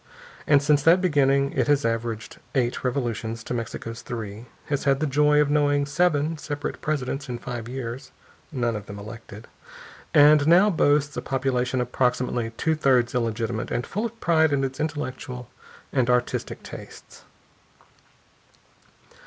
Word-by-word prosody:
And 145 -1 +5
since 145 0 +3
that 165 +5 +5
beginning 140 -5 +2
it - - +1
has 145 -2 +2
averaged 115 -1 -3 0.2
eight 120 -2 0
revolutions 115 -3 -2
to - - -5
Mexico's 115 0 -5
three, 110 0 -7 0.2
has 145 -2 -2
had 135 -1 +3
the 155 - 0
joy 150 +1 +3
of 145 -1 +2
knowing 145 -1 +2
seven 155 0 +1
separate 145 -1 -5
presidents 140 -2 -2
in 120 - -3
five 120 -1 -6
years 125 -1 -6 0.4
none 120 -5 -1
of 105 -1 -7
them 100 - -8
elected 110 +1 -10 0.6
and 145 0 +6
now 185 +5 +6
boasts 145 -3 +2
a - - -1
population 130 -1 -1
approximately 125 -1 0
two 160 - +1
thirds 130 -6 +2
illegitimate 115 -1 -2
and 120 - -2
full 215 +4 -2
of 230 0 -16
pride 160 -2 +3
in 140 -1 +1
its 135 0 -3
intellectual 130 -5 -4 0.4
and 125 -3 +2
artistic 125 0 -1
tastes. - - -11
135 Hz, 145 wpm, -25 LUFS, 120-145 Hz, 0.6 s, and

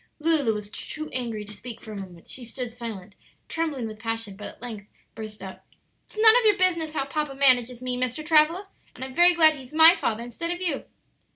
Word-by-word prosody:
Lulu 300 -8 +2
was 210 0 -7
too 310 +5 -7
angry 230 -4 -4
to 210 - -10
speak 230 +2 -9
for 220 - -11
a - - -7
moment; 175 -3 -12
she 255 - -6
stood 240 +1 -6
silent, 220 -5 -8 0.3
trembling 310 -7 -3
with 215 0 -9
passion, 225 -3 -4
but 210 +1 -8
at - - -13
length 220 -4 -8 0.3
burst 215 -2 -9
out: 190 -1 -9 0.4
"It's - - -16
none 440 +1 +7
of - - +2
your 420 -2 +4
business 335 -4 +2
how 275 -3 -1
papa 295 0 -3
manages 250 -3 +3
me, 250 -1 -2
Mr. 255 +4 -3
Travilla; 325 +5 +3 0.3
and 260 - -6
I'm 260 - -9
very 350 +4 +5
glad 315 -2 +6
he's 270 0 -12
my 325 +2 +8
father 230 - -2
instead 245 +8 -6
of 350 0 -3
you!" 335 -7 -2
255 Hz, 215 wpm, -25 LUFS, 225-320 Hz, 0.4 s, my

